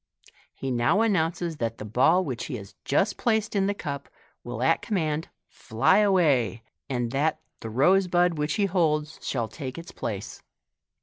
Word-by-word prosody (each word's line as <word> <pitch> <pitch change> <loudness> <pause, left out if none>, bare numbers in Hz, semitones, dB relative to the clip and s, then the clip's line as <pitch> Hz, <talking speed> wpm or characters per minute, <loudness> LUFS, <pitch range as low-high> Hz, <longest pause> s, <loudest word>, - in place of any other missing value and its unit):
He 135 - -4
now 120 - +2
announces 170 -5 0
that 115 -3 -2
the 105 - -7
ball 160 - +3
which 130 -5 -4
he 140 - -5
has 100 -4 -9
just 195 +9 +1
placed 220 -3 0
in 195 -1 +2
the 205 - 0
cup 140 -6 -5 0.3
will 120 0 -4
at 165 +5 +3
commaud 160 -7 -1 0.2
fly 115 - +2
away, 145 - +2 0.3
and 120 -3 -1
that 150 +4 0 0.2
the 115 - -6
rose 180 - +3
bud 175 0 +2
which 150 0 -1
he 205 - +2
holds 155 -5 0
shall 120 -4 -2
take 130 +4 -7
its 170 +1 -8
place. 100 -3 -5
150 Hz, 170 wpm, -26 LUFS, 125-180 Hz, 0.3 s, ball